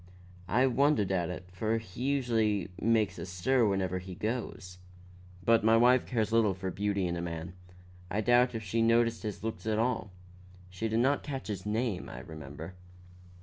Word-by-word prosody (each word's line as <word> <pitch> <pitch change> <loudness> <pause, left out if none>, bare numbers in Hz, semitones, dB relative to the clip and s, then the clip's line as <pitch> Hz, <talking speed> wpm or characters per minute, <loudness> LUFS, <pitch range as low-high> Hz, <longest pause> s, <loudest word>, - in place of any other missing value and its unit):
I 120 +8 +3
wondered 135 -5 +2
at 90 -3 0
it, 90 0 -7
for 110 +4 0
he 110 0 -9
usually 115 -8 +1
makes 110 -4 +2
a - - -4
stir 110 +7 +2
wherever 95 -2 0
he 90 0 -8
goes. 100 -4 -4 0.7
But 115 -2 +4
my 110 +1 +5
wife 125 +2 +4
cares 110 -3 0
little 110 -4 +3
for 95 0 -4
beauty 100 0 -1
in 85 0 -1
a 85 - -3
man; 85 0 -5 0.6
I 105 - 0
doubt 120 +2 +4
if 110 - -4
she 115 +4 0
noticed 115 0 +3
his 105 -2 -5
looks 110 0 -4
at 110 -1 +1
all. 115 -3 0 0.6
She 95 +5 -3
did 110 +1 +1
not 140 +3 +2
catch 135 -5 -6
his 100 -1 -4
name, 110 -2 -1
I - - -8
remember." 75 +3 -9
110 Hz, 180 wpm, -30 LUFS, 95-115 Hz, 0.7 s, my